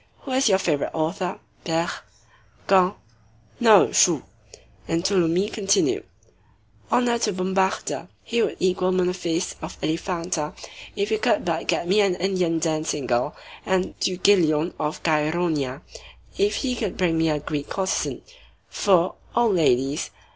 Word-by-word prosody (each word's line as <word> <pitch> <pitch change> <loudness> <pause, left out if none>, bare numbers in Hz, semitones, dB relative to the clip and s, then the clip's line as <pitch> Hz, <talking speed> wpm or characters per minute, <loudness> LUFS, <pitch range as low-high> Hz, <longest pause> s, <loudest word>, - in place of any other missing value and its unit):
Who 270 - -7
is 260 -2 +3
your 190 - +5
favorite 160 -7 -1
author?" 170 +3 -2 0.2
"Ber—" 165 0 0 0.8
"Quin?" 185 -1 +4 0.7
"No; 220 -4 +6
Choux." 165 -7 +4 0.6
And 165 +1 0
Tholomyès 185 0 +1
continued:— 210 - +1 0.9
"Honor 240 -1 +2
to 220 - +1
Bombarda! 190 +1 -1 0.2
He 235 0 0
would - - -1
equal 185 0 +1
Munophis 180 -1 -1
of 160 - -7
Elephanta 165 -1 -2 0.4
if 405 0 -1
he 435 0 0
could - - +1
but - - -2
get 170 - 0
me 200 +4 +4
an 195 -3 +2
Indian 180 -2 0
dancing 155 -3 -1
girl, 125 +4 0 0.3
and 185 -1 0
Thygelion 175 -4 +2
of 150 0 -3
Chæronea 155 -3 0 0.5
if 405 +1 +1
he 255 -3 -1
could 215 -6 -3
bring 175 -3 +1
me 160 0 +2
a 150 - +1
Greek 145 0 -4
courtesan; 190 -1 -2 0.5
for, 185 -3 +2 0.2
oh, 240 -1 +3
ladies! 145 -6 +1
180 Hz, 135 wpm, -23 LUFS, 160-195 Hz, 0.9 s, No